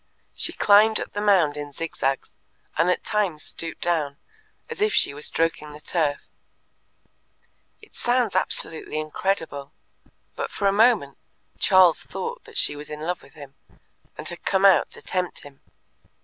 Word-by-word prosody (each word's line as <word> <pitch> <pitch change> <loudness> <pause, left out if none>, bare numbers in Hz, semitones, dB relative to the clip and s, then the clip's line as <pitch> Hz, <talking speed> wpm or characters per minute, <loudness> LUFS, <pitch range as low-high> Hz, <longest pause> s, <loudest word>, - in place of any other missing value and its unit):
She - - -2
climbed 215 +2 +5
up - - -6
the 205 - -3
mound 185 -8 +3
in 145 -1 -6
zigzags, 135 -4 -3 0.4
and 165 +3 +2
at 180 - 0
times 190 -8 -1
stooped 165 0 -5
down, 155 -5 0 0.5
as 465 -3 -7
if 425 0 +2
she - - +2
was 145 +1 -2
stroking 165 -2 -1
the 150 - -11
turf. 150 -2 -1 1.6
It 440 - -18
sounds 240 -5 0
absolutely 160 -4 -1
incredible, 155 -3 -3 0.6
but - - -3
for 200 - -4
a - - +4
moment 210 - +3 0.4
Charles 185 -4 +5
thought 480 +2 -6
that 450 -3 -9
she 145 - +2
was 145 0 -9
in 150 0 -7
love 175 +2 -3
with - - -18
him, 140 -3 -11 0.6
and - - -6
had 175 - -6
come 195 0 +2
out 195 - +6
to - - -10
tempt 180 -1 -2
him. 140 -1 -15
170 Hz, 160 wpm, -24 LUFS, 150-205 Hz, 1.6 s, out